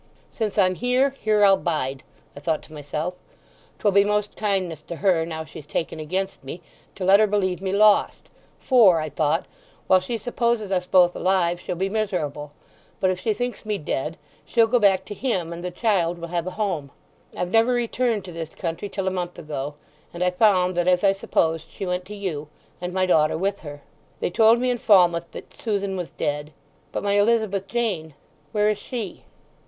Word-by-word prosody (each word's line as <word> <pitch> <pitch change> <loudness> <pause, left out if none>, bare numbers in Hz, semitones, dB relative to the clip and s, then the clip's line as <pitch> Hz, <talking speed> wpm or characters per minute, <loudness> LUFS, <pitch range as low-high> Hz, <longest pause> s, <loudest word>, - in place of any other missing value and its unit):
"'Since 215 -3 -3
I'm 185 -2 +4
here, 250 +6 +1
here 215 -6 +2
I'll 195 -1 +6
bide,' 140 -7 -2 0.3
I - - -8
thought 155 +1 -1
to 155 - -15
myself; 150 +4 -4 0.6
''twill 205 -2 +1
be 200 0 +6
most 210 0 -1
kindness 190 -7 -1
to 170 - -7
her, 170 -3 +2
now 160 -1 -5
she's 155 -1 -11
taken 160 0 -3
against 185 +4 -3
me, 135 +6 -7 0.4
to 190 - -4
let 195 +2 +7
her 215 - +5
believe 190 -3 0
me 190 -1 -2
lost, 210 +1 +3 0.3
for,' 215 -10 +5
I 155 0 -3
thought, 155 +3 0 0.4
'while 185 - +5
she 205 +6 -4
supposes 235 -2 -1
us 180 -1 0
both 180 -1 +5
alive 175 -2 +1
she'll - - -4
be 190 +3 -1
miserable; 175 -9 -2 0.5
but 190 -2 +2
if 185 - -3
she 220 - 0
thinks 245 +3 -3
me 210 -2 -2
dead 150 0 -3 0.3
she'll 230 -2 +3
go 240 +2 +2
back 195 -3 +3
to 210 - -6
him, 185 -9 -2
and 170 +1 -8
the 180 - -2
child 180 -3 0
will 170 0 -7
have 175 0 -2
a 185 - -6
home.' 180 -10 -2 0.5
I've 180 0 -2
never 225 +2 +4
returned 240 -3 0
to 180 - -8
this 165 -1 -7
country 165 +5 -4
till 195 -1 -3
a - - +2
month 180 -1 -4
ago, 145 -2 -5 0.4
and 175 - -1
I 180 - +2
found 185 -2 +3
that, 175 0 +1
as 180 0 +3
I 195 - +6
supposed, 165 -4 0
she 195 - -6
went 180 0 -2
to 210 - -8
you, 170 -7 -4 0.3
and 180 0 -3
my 185 0 +1
daughter 155 -4 +3
with 195 +3 -1
her. 145 -2 -10 0.4
They - - -1
told 225 +4 +5
me 250 +1 +1
in 245 - -2
Falmouth 175 -7 +4
that - - -10
Susan 200 -3 -2
was 180 -3 -4
dead. 150 +1 -3 0.4
But - - -3
my 200 0 +1
Elizabeth 205 -3 +1
Jane—where 195 -3 -2
is 210 - -1
she?" 230 -8 -6
185 Hz, 200 wpm, -24 LUFS, 165-210 Hz, 0.6 s, let